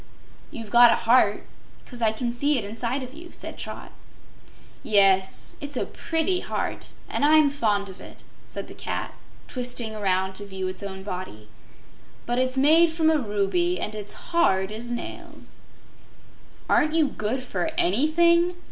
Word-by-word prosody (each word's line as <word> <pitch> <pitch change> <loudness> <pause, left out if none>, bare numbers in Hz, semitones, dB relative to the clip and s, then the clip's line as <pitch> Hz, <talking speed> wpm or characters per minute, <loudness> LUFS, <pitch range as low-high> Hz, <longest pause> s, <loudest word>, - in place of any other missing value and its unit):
"You've 225 -3 -9
got 240 0 +8
a - - +4
heart, 230 -3 +3 0.4
'cause 245 -2 -10
I 220 -1 +3
can 235 +2 -3
see 285 +4 +2
it 230 - -1
inside 235 +5 -3
of 255 +1 -9
you," 340 +3 -11
said - - -6
Trot. - - -7 0.9
"Yes; 195 -2 +3
it's 285 -2 -5
a - - 0
pretty 335 +3 -1
heart, - - -3
and - - -2
I'm 305 -1 +5
fond 210 -7 0
of 190 -1 -11
it," - - -13 0.2
said - - -8
the - - -10
cat, - - -4 0.3
twisting 245 -3 -3
around 190 -2 0
to 205 - -7
view 190 -1 -4
its 185 +1 -5
own 190 -1 -7
body. 180 - -7 0.8
"But 240 +1 -1
it's 255 0 0
made 320 +5 +6
from 320 -1 +2
a 310 - +2
ruby, 250 - 0
and 210 - -3
it's 210 -1 -4 0.2
hard 190 - +2
as 230 +3 -5
nails." 240 0 -8 1.1
"Aren't 305 +1 +2
you 315 -3 +4
good 250 +1 -3
for 285 +5 -2
ANYthing?" 340 +1 +3
240 Hz, 160 wpm, -25 LUFS, 205-305 Hz, 1.1 s, got